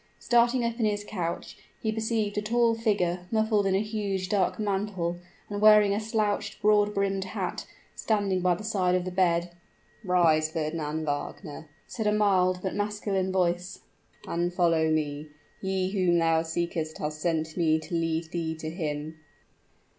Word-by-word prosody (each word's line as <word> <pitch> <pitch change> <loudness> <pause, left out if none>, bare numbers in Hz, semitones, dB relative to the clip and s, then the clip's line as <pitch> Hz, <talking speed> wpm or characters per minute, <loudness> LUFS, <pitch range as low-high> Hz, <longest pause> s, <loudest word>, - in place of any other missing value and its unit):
Starting 240 0 +3
up 235 +1 -3
in 225 - +2
his 205 0 -1
couch, 175 -5 -5 0.2
he 220 - -1
perceived 220 -1 -1
a 210 - 0
tall 230 +2 +2
figure, 185 -6 0
muffled 220 -2 +2
in 190 - +2
a 195 - +2
huge 200 -4 -3
dark 195 -2 +1
mantle, 195 -4 -2 0.3
and 205 0 -4
wearing 210 -1 +7
a 205 - 0
slouched 215 -1 -1
broad 210 0 +3
brimmed 195 -1 0
hat, 190 - -4 0.3
standing 200 -4 0
by 180 -1 +3
the 210 - -8
side 190 -5 +1
of 180 -1 0
the 185 - -3
bed. 175 -1 +1 0.5
"Rise, 165 -4 +3
Fernand 155 -1 -3
Wagner," 145 +1 -5 0.2
said 220 -3 -3
a - - +4
mild 185 -3 +2
but 190 - -2
masculine 205 -2 -1
voice, 180 0 -1 0.5
"and 175 +1 -1
follow 165 -3 +2
me. 150 -1 -1 0.3
He 190 -1 -1
whom 180 -4 +2
thou 165 -1 +3
seekest 160 -1 -3
has 150 0 -3
sent 160 -1 -1
me 160 -3 +3
to 160 +2 -8
lead 165 0 -1
thee 165 -2 -2
to 155 0 -6
him." 155 -2 -4
185 Hz, 160 wpm, -27 LUFS, 165-210 Hz, 0.5 s, wearing